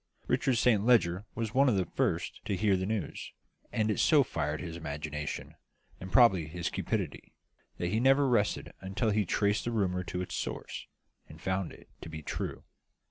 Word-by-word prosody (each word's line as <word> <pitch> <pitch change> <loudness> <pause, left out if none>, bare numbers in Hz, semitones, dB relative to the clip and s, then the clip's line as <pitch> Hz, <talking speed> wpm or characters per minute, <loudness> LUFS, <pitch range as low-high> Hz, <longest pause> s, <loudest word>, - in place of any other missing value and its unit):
Richard 130 +1 +2
Saint 115 -3 +3
Leger 100 -5 +3
was 110 -2 -3
one 135 +1 +5
of 115 - +2
the 95 -2 +1
first - - -1
to 100 - 0
hear 100 +1 +3
the 95 0 -1
news; 110 -1 -3 0.4
and 110 -1 +1
it - - -1
so 150 -3 +6
fired 75 - -2
his 85 -2 -6
imagination 75 -2 -5 0.5
and 95 0 -8
probably 95 -10 +5
his 85 +1 -3
cupidity - - -3 0.4
that 85 - -1
he 110 - +1
never 135 +3 +5
rested 115 -5 +1
until 100 +4 0
he 105 - +2
had 100 - -1
traced 105 0 +1
the 120 - -1
rumour 90 -5 0
to 90 - -4
its - - -7
source, - - -4 0.4
and 80 - -12
found 95 +1 -1
it - - -15
to - - -7
be 80 -1 -7
true. - - -4
100 Hz, 190 wpm, -31 LUFS, 85-115 Hz, 0.5 s, so